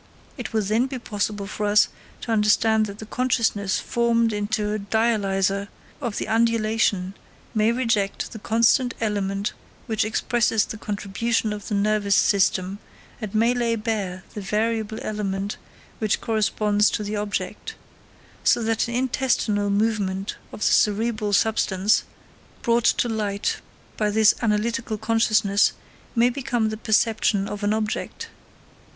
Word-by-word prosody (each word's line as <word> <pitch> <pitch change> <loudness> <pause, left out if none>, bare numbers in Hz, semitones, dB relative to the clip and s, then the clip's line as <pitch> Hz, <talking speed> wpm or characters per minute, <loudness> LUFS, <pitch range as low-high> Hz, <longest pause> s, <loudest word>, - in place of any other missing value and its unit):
It - - -6
will 220 -1 +1
then 220 +6 +1
be 265 -1 -5
possible 205 -3 -3
for 210 +1 -3
us 210 +1 +5 0.3
to 230 - -4
understand 220 0 +3
that 200 0 -8
the 220 - -8
consciousness 220 -5 0
formed 230 -1 +1
into 210 0 -1
a 215 - -2
dialyser 200 -2 0 0.3
of 235 -6 -3
the - - -3
undulation 220 -4 +1 0.4
may 220 +1 +3
reject 230 -5 0
that 220 - -9
constant 235 +3 +3
element 200 -2 -1 0.3
which 220 -4 0
expresses 220 0 +1
the 220 - -7
contribution 215 +2 -1
of 205 -1 -7
the 210 - -1
nervous 205 0 +2
system, 195 -1 +2 0.4
and 215 -1 -5
may 230 +3 +3
lay 235 -2 0
bare 205 -5 -3
the 210 - -5
variable 220 +2 -1
element 200 -1 -3 0.4
which 215 -2 +1
corresponds 210 -1 +2
to 210 - -2
the 210 +1 -3
object: 205 - -4 0.7
so 235 - +3
that 225 0 0
an 235 - -4
intestinal 245 -5 0
movement 200 -2 0 0.2
of - - -10
the - - +1
cerebral 215 0 +1
substance, 205 -1 +2 0.6
brought 235 -1 +2
to - - +3
light 210 -3 -1 0.4
by 210 -1 +1
this 215 0 +5
analytical 225 0 0
consciousness, 220 -2 +2 0.4
may 240 +1 +4
become 245 -4 -1
the 215 - -3
perception 215 -2 +1
of 205 0 -6
an 205 - +2
object. 220 - -3
215 Hz, 140 wpm, -24 LUFS, 205-230 Hz, 0.7 s, us